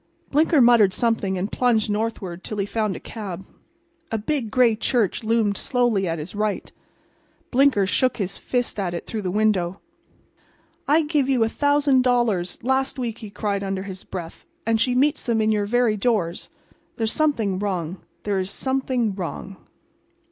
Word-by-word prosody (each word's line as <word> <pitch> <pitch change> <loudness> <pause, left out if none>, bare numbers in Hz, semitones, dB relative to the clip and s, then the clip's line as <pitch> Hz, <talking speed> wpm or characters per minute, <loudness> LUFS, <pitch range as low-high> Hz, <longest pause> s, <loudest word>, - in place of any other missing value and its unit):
Blinker 305 0 +4
muttered 235 -5 +6
something 220 -5 0
and 195 +4 -3
plunged 235 -4 +2
northward 205 -5 -3
till 215 - -5
he 200 - 0
found 210 -2 -1
a - - -6
cab. 195 -4 -7 0.7
A 225 - 0
big, 235 +1 -2
gray 235 0 +4
church 225 -1 0
loomed 220 -2 +1
slowly 240 -7 +1
at 165 0 -1
his 155 +4 -7
right. 210 0 -2 0.8
Blinker 265 -6 +4
shook 255 +6 +1
his 195 -2 -3
fist 245 -4 -2
at 180 -3 -2
it 170 - -5
through 220 - -4
the 185 - -2
window. 195 -2 +1 1.1
"I 315 +3 +4
gave 295 -3 +1
you 255 -4 +3
a 225 - +1
thousand 285 -1 +3
dollars 240 -8 +1
last 265 +2 0
week," 235 -3 -3
he 215 - -8
cried 200 -1 -2
under 195 -1 -2
his 190 -1 -8
breath, 170 -3 -7 0.2
"and 225 -1 +2
she 250 -1 +2
meets 290 +4 +2
them 230 -3 0
in 220 0 +2
your 205 -1 0
very 240 -1 +2
doors. 195 -6 -1 0.5
There 225 - -2
is 220 - +1
something 225 -12 +1
wrong; 185 -3 -2 0.3
there 200 -2 0
is 185 0 -2
something 260 -3 -1
wrong." 190 +1 -6
220 Hz, 170 wpm, -23 LUFS, 195-245 Hz, 1.1 s, muttered